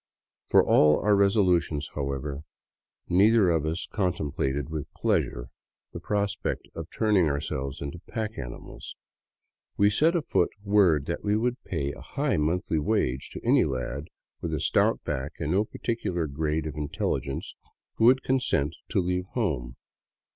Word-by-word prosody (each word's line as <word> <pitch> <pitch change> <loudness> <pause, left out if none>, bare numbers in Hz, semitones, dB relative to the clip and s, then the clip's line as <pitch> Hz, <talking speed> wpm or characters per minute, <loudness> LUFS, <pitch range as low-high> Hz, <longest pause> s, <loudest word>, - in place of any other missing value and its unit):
For - - +5
all 75 0 +5
our 105 0 +4
resolutions, 90 -7 +2
however, 70 0 -3 0.7
neither 100 +1 +5
of 80 -2 +1
us 80 +2 -2
contemplated 75 -7 -2
with 80 -3 -5
pleasure - - 0 0.4
the - - -5
prospect 100 -1 -2
of 80 0 -7
turning 105 -7 +2
o.urselves 70 -1 -3
into 70 +4 -6
pack 110 -1 -3
animals. - - -8 0.8
W> 100 +1 +4
set 160 - +3
afoot 100 - +1
word 95 -8 +4
that 85 - -4
we 105 0 +2
would 125 +3 -1
pay 70 0 -2
a - - -11
high 140 -7 -1
monthly 80 +1 0
wage 75 - 0
to - - -8
any - - +5
lad 65 +2 -3 0.4
with 80 -2 -2
a - - -2
stout - - +2
back 65 +4 -3
and 75 -1 -2
no 100 +4 +2
particular 100 -8 -2
grade 75 +2 -2
of 80 - -4
intelligence 70 -2 -3 0.4
who 110 - +3
would 130 +2 +5
consent 125 - +1
to - - +1
leave 90 0 -1
home. 70 - -1
85 Hz, 145 wpm, -27 LUFS, 70-105 Hz, 0.8 s, For